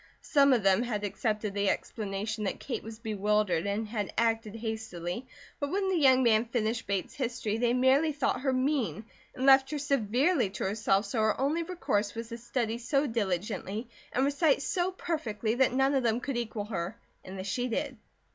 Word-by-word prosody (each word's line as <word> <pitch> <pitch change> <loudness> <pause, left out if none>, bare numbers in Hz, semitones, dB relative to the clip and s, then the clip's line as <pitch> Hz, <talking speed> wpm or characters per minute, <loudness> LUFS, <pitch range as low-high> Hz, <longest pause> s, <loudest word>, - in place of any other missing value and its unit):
Some 280 -2 +4
of 240 -5 +3
them 195 +2 +4
had 225 -4 -2
accepted 210 0 -2
the 200 -1 +1
explanation 215 0 -3
that - - -2
Kate 260 - -4
was 225 0 -9
"bewildered" 210 -4 0
and 210 +2 -1
had 210 -2 -3
acted 225 -2 +1
hastily; 220 -2 -4 0.3
but 285 - -2
when 385 +3 0
the 380 - +1
young 260 -3 +5
man 225 -1 +4
finished 225 -1 -1
Bates 195 -2 -2
history, 235 -5 -2
they 240 0 +2
merely 265 +5 +4
thought 275 -3 -1
her 270 -1 +1
mean, 255 -4 0 0.3
and 260 - -2
left 270 0 +7
her 300 - -2
severely 275 - +1
to 195 - -5
herself, 200 0 +1
so 210 +3 -2
her 215 -1 +2
only 290 +5 +1
recourse 280 - -1
was 230 0 -5
to 230 0 -6
study 235 -1 -2
so 275 +4 +1
diligently, 210 0 -2 0.2
and 265 - +2
recite 285 0 +2
so 355 +5 0
perfectly 235 - -2
that 260 +2 +3
none 270 +2 +2
of 270 - +2
them 230 -1 +1
could 275 +1 -4
equal 225 -3 -3
her, 195 0 -4 0.3
and 190 +1 -8
this 190 - -5
she 245 +6 -1
did. 270 +3 -2
230 Hz, 190 wpm, -29 LUFS, 210-270 Hz, 0.3 s, left